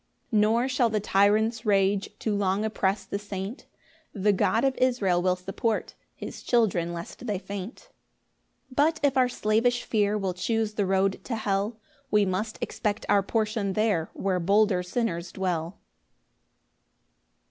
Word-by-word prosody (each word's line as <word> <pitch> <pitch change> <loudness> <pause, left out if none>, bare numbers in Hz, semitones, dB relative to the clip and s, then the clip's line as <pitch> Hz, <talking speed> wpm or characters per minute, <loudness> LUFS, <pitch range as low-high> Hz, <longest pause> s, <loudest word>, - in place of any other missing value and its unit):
5 - - -17
Nor 225 +4 +3
shall 255 -3 +2
the 215 -1 0
tyrant's 215 +3 +2
rage 200 -2 +2
Too 215 - -2
long 200 +1 0
oppress 200 -2 0
the 200 - -4
saint; 205 +3 -6 0.5
The 205 0 +2
God 225 +5 +2
of 270 -1 +1
Israel 210 -9 +2
will 180 0 +2
support 195 +4 -2 0.2
His - - -8
children 190 -8 +1
lest 170 +8 -7
they 205 -3 0
faint. 200 +3 -7
6 - - -23 0.8
But 305 +5 +2
if 280 -2 +3
our 255 -1 +4
slavish 240 +2 +1
fear 210 -1 +1
Will 190 -3 -2
chuse 215 +4 -1
the 205 -2 0
road 195 0 +1
to 240 - -2
hell, 210 +1 -1 0.3
We 210 -3 +3
must 205 +4 -2
expect 210 -1 -2
our 205 -1 +5
portion 215 -1 -1
there 205 -6 +1
Where 190 -2 0
bolder 200 +1 +3
sinners 180 -3 -2
dwell. 175 -2 -2
205 Hz, 150 wpm, -27 LUFS, 190-225 Hz, 0.8 s, our